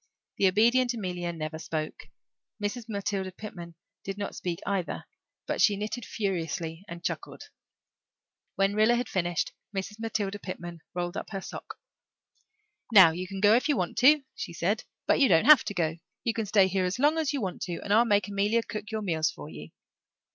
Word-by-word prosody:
The 195 - +4
obedient 235 +6 +3
Amelia 180 -5 -3
never 160 -1 -5
spoke; 155 -1 -4 0.5
Mrs. 220 +3 -4
Matilda 200 -2 -2
Pitman 175 -4 -9 0.3
did 195 0 -5
not 205 - -4
speak 175 -2 -3
either; 195 -4 -2 0.4
but - - -1
she 205 -2 +5
knitted 215 +3 -4
furiously 170 -4 -3
and 170 -2 -8
chuckled. - - -5 1.1
When 195 +1 +2
Rilla 215 +3 +4
had 245 -1 -1
finished, 175 -4 -1 0.3
Mrs. 210 +3 -4
Matilda 205 -3 -2
Pitman 175 -3 -7 0.2
rolled 175 +1 -2
up - - -5
her 195 - -4
sock. - - -8 1.2
"Now 190 -7 +9
you 180 +3 -5
can 195 0 -6
go 205 +1 +6
if 250 +6 +2
you 290 - +3
want 180 - -1
to," 290 +3 +6
she - - -6
said, 190 +6 -1 0.2
"but - - +3
you 275 - +5
don't 165 -3 +5
have 305 -1 +9
to 205 - -3
go. 165 -2 0 0.3
You 230 - +1
can 220 -2 -2
stay 200 -1 +5
here 190 0 0
as 180 +4 -1
long 295 +5 +3
as 310 -2 0
you 285 - -1
want 190 -6 -4
to 175 -3 -4
and 205 - 0
I'll 225 +3 +6
make 205 -4 +2
Amelia 205 +3 +1
cook 215 -2 -6
your 220 -1 -3
meals 160 -5 +1
for 75 0 -9
you." 80 - -9
200 Hz, 190 wpm, -28 LUFS, 175-220 Hz, 1.2 s, Now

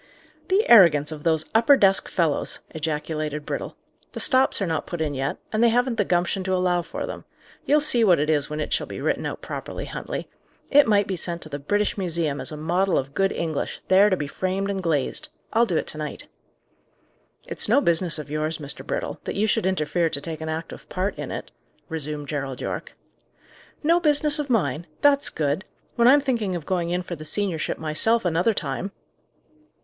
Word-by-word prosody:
"The 390 +4 +2
arrogance 165 -9 +7
of 150 -1 -7
those 160 -2 +2
upper 235 +5 +6
desk 195 -3 +3
fellows!" 165 -5 -1
ejaculated 155 -1 -3
Brittle. - - -4 0.4
"The - - -5
stops 265 -2 +4
are 195 - 0
not 160 -3 -2
put 175 - -5
in 155 -2 -1
yet, 135 +1 -2 0.2
and 215 +2 +2
they 235 - +6
haven't 245 0 +1
the 205 - +2
gumption 180 +2 0
to 190 0 +1
allow 180 -1 +1
for 170 - -5
them. - - -7 0.4
You'll 300 +1 +4
see 250 -6 +4
what 180 -5 +5
it 150 - 0
is 150 -2 +1
when 150 0 -4
it 150 - -2
shall - - -1
be - - -7
written - - -1
out - - -7
properly, - - -6
Huntley. - - -5 0.4
It 290 -2 +6
might 205 -2 +3
be 190 - -3
sent 170 0 -1
to 155 - -10
the 145 -1 -5
British 205 +8 0
Museum 165 -6 -1
as - - -2
a 150 - -6
model 175 +5 +1
of 135 +1 -3
good 195 +3 +1
English, 160 -3 -3
there 195 +2 +6
to 185 - +1
be 150 - -3
framed 190 +6 -2
and 195 -1 -3
glazed. 155 -6 0 0.2
I'll 230 +1 +4
do 170 - 0
it - - -1
to 155 - -7
night." 150 - -6 1.2
"It's - - -1
no - - +5
business 170 -6 +1
of 150 - -6
yours, 155 +2 -2
Mr. 145 -2 -2
Brittle, - - -4
that - - -4
you 205 - +1
should 195 -3 +1
interfere 170 -2 0
to 140 - -3
take 160 +1 -7
an 160 - -4
active 160 +1 -6
part 190 +2 -2
in - - -4
it," - - -6 0.4
resumed 150 -2 -4
Gerald 135 -3 -4
Yorke. - - -5 0.9
"No 335 +3 +4
business 300 -2 +3
of 290 -2 -3
mine! 170 - 0
That's 285 -1 +4
good! 150 +4 -1 0.3
When 235 -1 +4
I'm 285 +3 +7
thinking 230 -9 -1
of 165 -4 -5
going 175 -2 -1
in 180 +1 -1
for 175 - -6
the 155 - -9
seniorship 180 0 -1
myself 175 +9 +1
another 175 +6 +2
time!" 195 +1 -3
175 Hz, 205 wpm, -24 LUFS, 155-210 Hz, 1.2 s, arrogance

